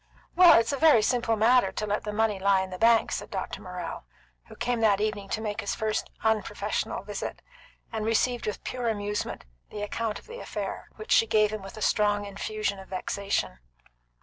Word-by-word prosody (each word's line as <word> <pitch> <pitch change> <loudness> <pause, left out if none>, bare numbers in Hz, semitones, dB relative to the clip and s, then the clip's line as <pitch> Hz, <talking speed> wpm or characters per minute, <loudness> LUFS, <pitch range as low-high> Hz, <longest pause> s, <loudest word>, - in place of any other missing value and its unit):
"Well, 350 -2 +8
it's 230 +4 0
a - - -1
very 305 -9 +6
simple 235 -1 +1
matter 225 -1 +4
to 215 - -2
let 210 +2 -2
the 210 - -2
money 210 -1 +1
lie 195 0 +3
in 190 0 -5
the 185 - -6
bank," 230 0 +4
said - - -4
Dr. - - -4
Morrell, - - -6 0.4
who - - -12
came 245 -1 -1
that 210 -3 +4
evening 210 -2 -2
to 220 - -2
make 210 -2 -3
his 200 - -2
first 215 -1 -2
unprofessional 220 -1 -1
visit, - - -6 0.5
and 220 -1 -2
received 230 +2 +1
with 210 - -4
pure 245 -2 -2
amusement 205 -1 -3 0.2
the 205 - -5
account 215 +1 -2
of - - -14
the 470 +2 -9
affair, - - -5
which 435 - -9
she 455 -2 +5
gave 215 -1 +3
him 215 -1 -4
with 195 +2 -10
a 215 - -3
strong 205 0 +2
infusion 200 0 -3
of 190 - -11
vexation. 190 - -2
215 Hz, 200 wpm, -27 LUFS, 205-230 Hz, 0.5 s, Well